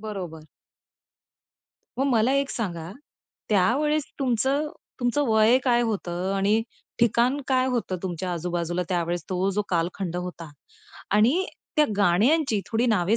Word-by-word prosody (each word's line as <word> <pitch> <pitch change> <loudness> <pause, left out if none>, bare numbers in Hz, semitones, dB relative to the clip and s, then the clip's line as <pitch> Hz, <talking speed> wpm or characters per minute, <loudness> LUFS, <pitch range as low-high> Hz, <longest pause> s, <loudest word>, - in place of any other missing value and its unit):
बरोबर. 185 -7 -6 1.5
मग 275 - +2
मला 235 +1 +3
एक 275 0 +1
सांगा, 175 -7 -4 0.6
त्यावेळेस 275 +10 +2
तुमचं 270 +3 +1 0.3
तुमचं 245 +4 +1
वय 220 +3 +5
काय 240 -1 +3
होतं 190 -4 -2
आणि 210 +3 +2 0.4
ठिकाण 240 +4 +2
काय 255 -1 +3
होतं 240 -7 -1
तुमच्या 180 0 -3
आजूबाजूला 175 +1 -2
त्यावेळेस, 175 -2 -1
तो 185 +2 +1
जो 205 +2 0
कालखंड 175 +1 -1
होता 180 -3 -6 0.6
आणि 260 - +3 0.3
त्या 305 - +6
गाण्यांची 215 - +3
थोडी 230 +2 +1
नावे 210 -1 +2
215 Hz, 125 wpm, -25 LUFS, 180-250 Hz, 1.5 s, त्या